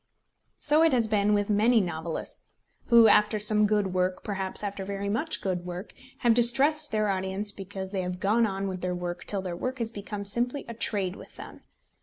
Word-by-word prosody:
So 300 +2 +3
it 325 -3 +4
has 235 -3 +2
been 210 -1 +2
with 205 -1 0
many 220 +3 +3
novelists, 165 -3 -4 0.3
who, 235 -2 +7
after 210 +1 +4
some 210 0 +2
good 205 -3 0
work, 185 0 -1
perhaps 195 -2 -4
after 200 -1 -4
very 200 +1 -4
much 300 +10 -2
good 180 -2 -2
work, 180 +3 -8 0.3
have 240 -2 +4
distressed 270 +6 +5
their 215 -1 0
audience 190 +2 -2
because 190 -1 -7
they 195 -2 -2
have 180 0 -5
gone 220 +4 +2
on 195 0 -4
with 185 -2 -5
their 180 0 -2
work 175 0 -6
till 195 -2 -2
their 180 -2 -5
work 255 +8 -4
has 230 -2 -3
become 205 -1 -7
simply 245 +7 +1
a 235 - -6
trade 200 -5 -1
with - - -14
them. - - -11
205 Hz, 200 wpm, -27 LUFS, 190-225 Hz, 0.3 s, who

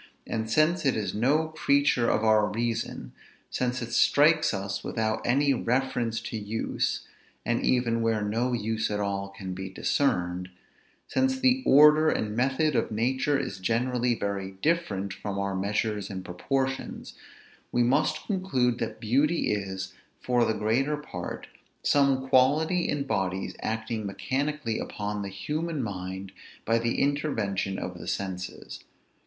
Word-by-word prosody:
And 110 -1 -3
since 155 +7 +3
it 135 - +2
is 105 -2 -2
no 145 +9 +2
creature 140 -5 +2
of 110 - +1
our 110 -1 +4
reason, 115 +1 -3 0.4
since 125 0 -1
it 115 - -6
strikes 150 +6 +4
us 100 -1 -3
without 110 -1 -1
any 140 +3 +3
reference 120 -2 0
to 115 -1 -4
use, 105 +2 -2 0.4
and 120 +1 0
even 120 -2 +2
where 115 -2 +1
no 115 +5 0
use 110 -1 -1
at 105 -1 -1
all 100 -1 -2
can 95 -1 -7
be 95 +1 -5
discerned, 90 -5 0 0.6
since 265 0 +1
the 260 0 +3
order 150 +3 +7
and 105 -6 -1
method 135 +4 +1
of - - +1
nature 130 +6 +1
is 130 -8 -4
generally 120 +4 +1
very 100 -2 -3
different 100 - 0
from 100 0 -5
our 100 0 -1
measures 105 +1 -1
and 95 -2 -6
proportions, 135 +9 -3 0.6
we 120 - +3
must 140 +6 +1
conclude 130 - 0
that - - -4
beauty 140 +9 +2
is, 95 -2 -4 0.3
for 120 -1 +2
the 110 - 0
greater 120 +8 +1
part, 90 -12 -6 0.4
some 135 -2 +3
quality 155 +8 +3
in 145 -1 0
bodies 95 -6 -2
acting 110 -1 -3
mechanically 135 +3 -2
upon 105 0 -4
the 100 - -4
human 150 - -3
mind 95 -2 -5 0.3
by 115 +1 +3
the 115 0 -1
intervention 110 -10 0
of 90 -1 -5
the - - -9
senses. 95 -2 -5
115 Hz, 145 wpm, -27 LUFS, 100-140 Hz, 0.6 s, order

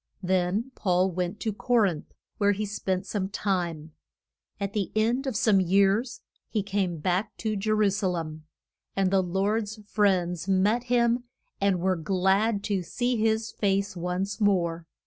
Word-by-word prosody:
Then 185 +7 0
Paul 185 -2 +1
went 180 +3 -3
to 220 - -1
Co 245 +4 -1
rinth, 190 -9 +2 0.3
where 205 -1 +4
he 210 +2 -2
spent 190 -2 -2
some 195 -2 -2
time. 175 -6 -2 0.7
At 200 0 -3
the 205 -3 -1
end 235 +5 +1
of 260 - -2
some 210 -2 +4
years 200 +6 +2 0.3
he 210 -3 -1
came 195 -3 -1
back 185 +7 -1
to 220 -1 -2
Je 205 +2 -2
ru 215 -2 +3
sa 200 0 -1
lem. 160 -3 -4 0.5
And 195 -1 +1
the 195 -1 +4
Lord's 205 +4 -1
friends 185 -4 +1
met 205 +6 +2
him, 240 0 +2 0.4
and 195 -2 +2
were 185 0 +1
glad 195 +5 +1
to 200 -3 0
see 245 +8 -1
his 220 0 +1
face 200 -1 0
once 180 +5 -3
more. 170 -5 +1
195 Hz, 160 wpm, -27 LUFS, 185-215 Hz, 0.7 s, where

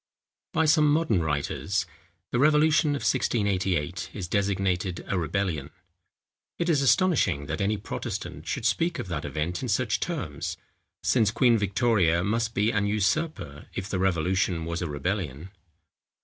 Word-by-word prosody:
By 160 - +2
some 155 -1 +4
modern 145 - +2
writers, 80 +5 -1 0.5
the 120 - +1
Revolution 150 +1 +4
of 140 - -4
1688 95 - 0
is 95 -4 -4
designated 95 -2 -1
a - - -1
Rebellion! 85 -4 -1 0.9
It 170 - -1
is 150 -4 +3
astonishing, 135 - +3
that 80 +5 -3
any 105 +2 +1
Protestant 100 - -6
should - - -3
speak 170 +1 +1
of 95 - -5
that 80 -4 -3
event 80 +3 -3
in 130 - -3
such 110 -1 +1
terms; 90 - -4 0.5
since 110 -5 +3
Queen 120 +2 +4
Victoria 100 -5 +2
must 110 +3 -1
be 105 +3 +2
an 100 -2 +1
usurper, 105 - -1
if 95 - -3
the 95 -2 -2
revolution 90 -1 +1
was 85 +1 -3
a 90 - -1
rebellion. 80 +1 -3
100 Hz, 145 wpm, -27 LUFS, 85-125 Hz, 0.9 s, some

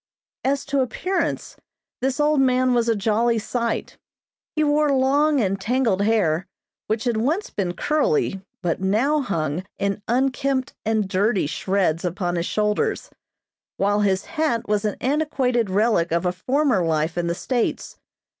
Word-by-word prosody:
As 275 +1 0
to 280 0 0
appearance 365 +9 -2 0.4
this 265 +3 -1
old 295 -1 +3
man 255 -1 +3
was 235 -1 +2
a 230 - +3
jolly 225 +3 +1
sight. 235 +2 -3 0.6
He 310 - +2
wore 295 0 +2
long 280 +3 +3
and 195 -3 0
tangled 230 -3 +1
hair 200 -5 +1 0.4
which 220 +1 -1
had 240 -3 0
once 305 - -1
been 180 -3 -2
curly, 310 - 0 0.2
but 175 +1 -1
now 230 +11 +2
hung 165 - -2
in 200 +1 -1
unkempt 265 +1 0
and 220 -2 0
dirty 200 0 +1
shreds 175 +1 0
upon 175 0 -2
his 170 0 -1
shoulders, 210 -1 -1 0.7
while 205 +1 +2
his 195 -2 +1
hat 310 -8 -1
was 210 0 0
an 210 - -1
antiquated 260 -5 0
relic 195 -4 +2
of 170 +2 0
a 180 - +2
former 250 +2 +1
life 160 0 0
in 175 -1 -1
the 170 - -1
States. 245 +4 -2
225 Hz, 150 wpm, -23 LUFS, 190-270 Hz, 0.7 s, old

